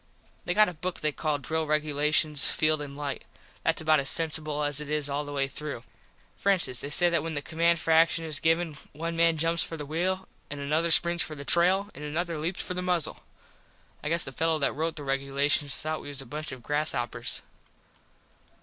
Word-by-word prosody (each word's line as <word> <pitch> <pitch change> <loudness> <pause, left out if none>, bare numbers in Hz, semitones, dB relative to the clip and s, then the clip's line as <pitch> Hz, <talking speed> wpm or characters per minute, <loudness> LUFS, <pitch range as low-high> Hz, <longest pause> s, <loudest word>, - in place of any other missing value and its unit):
They 175 - -1
got 215 0 +6
a 180 - -4
book 180 +3 -5
they 155 - +1
call 150 0 -1
Drill 160 +3 -3
Regulations 150 -1 +2
Field 155 -1 +1
and 140 -1 -8
Light. 145 -1 -4 0.4
Thats - - +1
about 155 -1 +4
as 135 - +5
censible 155 -2 0
as 145 0 0
it 150 - -8
is 150 -2 0
all 145 +1 -2
the 145 - -7
way 140 -1 0
through. 140 -3 -6 0.5
For 200 - +2
instance 165 -10 0
they 140 - -5
say 175 +4 +4
that 170 - +2
when 160 0 -5
the 145 - -1
command 170 +2 +2
for 165 - -2
action 165 0 +4
is 155 -3 -1
given 165 -1 0
one 165 +3 -4
man 165 -1 +3
jumps 165 +1 +2
for 165 - -5
the 150 - -6
wheel 185 +5 -2 0.2
and 145 - -6
another 155 +4 0
springs 170 +1 +6
for 155 - -1
the 140 -1 -9
trail 190 +6 +4
an - - -11
another 160 +2 -3
leaps 170 +4 -2
for - - -4
the 180 - -3
muzzle. 180 -3 0 0.8
I 150 - -2
guess 170 +1 +1
the 135 - -7
fellow 160 +4 0
that 140 - 0
rote 160 +1 -2
the 150 - -4
regulations 140 +1 0
thought 155 0 -3
we - - -10
was 140 -2 -4
a 135 - -4
bunch 150 +5 -6
of 130 -2 -9
grass 150 +4 0
hoppers. 120 -3 -3
155 Hz, 220 wpm, -27 LUFS, 145-165 Hz, 0.8 s, got